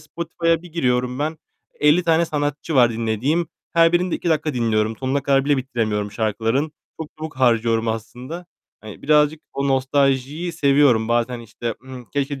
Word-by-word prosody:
Spotify'a 165 +1 -1
bir 175 -2 -13
giriyorum 125 -5 0
ben, 155 +2 -2 0.4
50 150 +4 +4
tane 165 -1 +3
sanatçı 145 0 -3
var 120 -3 +5
dinlediğim. 115 +9 0 0.3
Her 165 0 +5
birini 180 +1 +2
de - - 0
2 175 - -3
dakika 155 -2 0
dinliyorum. 110 -2 0
Sonuna 135 +3 -1
kadar 135 0 +2
bile 145 -1 +2
bitiremiyorum 110 -6 -2
şarkıların. 115 +7 -1 0.3
Çok 160 - -5
çabuk 155 -2 -7
harcıyorum 115 -2 +2
aslında. 125 +10 -6 0.3
Hani, 110 -2 -11
birazcık 150 +1 +3
o 140 0 -1
nostaljiyi 135 +4 +1
seviyorum. 140 -7 +3
Bazen, 120 +1 0
işte, 115 0 -5
ımm, 130 -2 -9
"Keşke" 140 -1 -2
135 Hz, 160 wpm, -21 LUFS, 120-155 Hz, 0.4 s, var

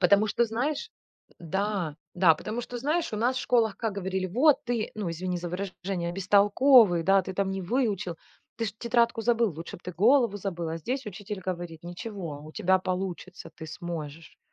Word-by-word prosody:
Потому 200 +3 +5
что, 235 +3 +2
знаешь, 245 +7 -2 0.5
да, 185 -2 -2 0.2
да, 175 -3 +6
потому 215 +9 -4
что, 245 0 -6
знаешь, 305 +3 0
у - - -2
нас 245 +4 +1
в - - 0
школах 225 -5 +2
как 225 0 -2
говорили: 190 -1 -2
"Вот 270 - +4
ты, 235 -2 -1
ну, 205 -5 -3
извини 180 +2 -3
за 175 0 -5
выражение, 180 -1 -4
бестолковый, 200 +1 +5
да, 195 +2 +4
ты 190 - -6
там 195 0 0
не 195 -1 -3
выучил, 200 -5 -1 0.4
ты 230 - -2
ж 205 - -3
тетрадку 235 0 +2
забыл, 230 -1 +2
лучше 165 +2 -7
бы - - -20
ты 180 - -5
голову 225 - +4
забыл", 175 -4 -4
а 165 - -3
здесь 255 - -3
учитель 205 0 -6
говорит: 175 -3 -5
"Ничего, 175 -5 -6
у 155 - -10
тебя 190 +3 +3
получится, 185 0 -4
ты 160 - -9
сможешь". 165 -1 -7
195 Hz, 185 wpm, -27 LUFS, 175-230 Hz, 0.5 s, да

